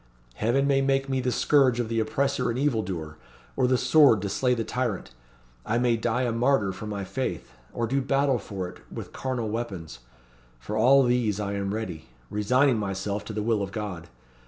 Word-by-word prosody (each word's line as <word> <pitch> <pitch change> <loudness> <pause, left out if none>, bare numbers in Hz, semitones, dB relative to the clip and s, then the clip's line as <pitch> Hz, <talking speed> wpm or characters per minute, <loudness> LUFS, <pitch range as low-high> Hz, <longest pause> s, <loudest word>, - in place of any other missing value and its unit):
Heaven 120 - +1
may 140 -1 +3
make 135 0 +1
me 130 -1 0
the 125 0 0
scourge 130 -1 +3
of 120 - 0
the 115 0 -1
oppressor 125 +4 0
and 120 - -2
evil 130 -5 +1
doer, 80 -5 -6 0.4
or 130 -2 +2
the 130 0 +3
sword 125 -5 +5
to 100 - -2
slay 125 +5 +1
the 115 - -2
tyrant. 120 - -3 0.5
I 115 - 0
may 120 -1 +2
die 120 +2 0
a 120 - 0
martyr 115 -3 +2
for 105 +3 -7
my 100 -2 -4
faith, 125 - -4 0.2
or 120 - -2
do 135 +4 0
battle 135 -1 +1
for 95 -3 -5
it 90 - -11
with - - -8
carnal 125 -4 -3
weapons. 95 - -5 0.6
For 65 - -5
all 135 +5 +6
these 120 -5 +1
I 100 -1 -2
am 100 -1 -2
ready; 100 -7 -5 0.2
resigning 125 +4 +2
myself 100 0 -3
to 110 - -6
the 105 0 -2
will 110 -2 +1
of 100 -1 -4
God. 95 -6 -5
115 Hz, 200 wpm, -26 LUFS, 100-130 Hz, 0.6 s, all